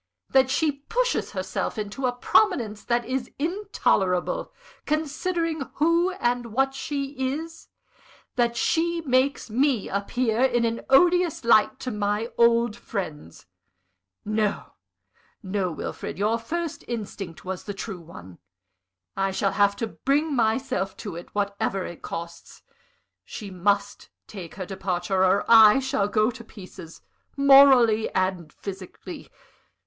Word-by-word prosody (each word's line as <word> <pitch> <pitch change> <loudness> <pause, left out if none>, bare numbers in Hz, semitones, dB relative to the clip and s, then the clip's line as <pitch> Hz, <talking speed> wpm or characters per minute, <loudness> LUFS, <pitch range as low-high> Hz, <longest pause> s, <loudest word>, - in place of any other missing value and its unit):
_ - - -29
that 265 -1 +5
she 305 +3 +2
pushes 470 - -2
herself - - -3
into 215 +5 -3
a - - +1
prominence 245 - +1
that 240 -1 0
is 255 0 -3
intolerable, 310 - 0 0.4
considering 320 +1 -1
who 335 +4 +3
and 245 -7 -1
what 270 +4 0
she 275 0 -4 0.2
is 325 +1 -8 0.7
that 235 -2 +1
she 340 +4 +1
makes 260 -4 0
me 260 -1 +1
appear 225 +4 -1
in 240 -3 +3
an 230 0 -2
odious 345 +1 +4
light 215 -2 +4
to 255 - -4
my 210 +2 -1
old 235 -1 +3
friends. 160 - -6 0.8
No, 215 -1 -1 0.7
no, 190 -2 -1
Wilfrid, 155 - -6
your 215 +4 +1
first 330 +7 -4
instinct 195 -8 -6
was 185 -1 -5
the 205 - -4
true 195 -3 -6
one. 95 - -13 0.8
I 195 0 0
shall 195 +1 0
have 200 -1 +2
to 230 - -2
bring 285 +6 0
myself 220 -4 0
to - - -7
it, 170 - -9
whatever 200 -1 -1
it 175 - -9
costs. 170 0 -8 0.6
She 205 -3 -8
must 200 +3 -1 0.2
take 185 -6 -9
her 190 -3 -5
departure, 185 0 -1
or 190 +1 +3
I 220 0 +8
shall 260 -7 0
go 215 +2 +2
to 230 - -11
pieces, 185 -6 -12 0.4
morally 270 -5 +6
and 185 -4 -1
physically. 190 -2 -9
230 Hz, 130 wpm, -25 LUFS, 195-270 Hz, 0.8 s, I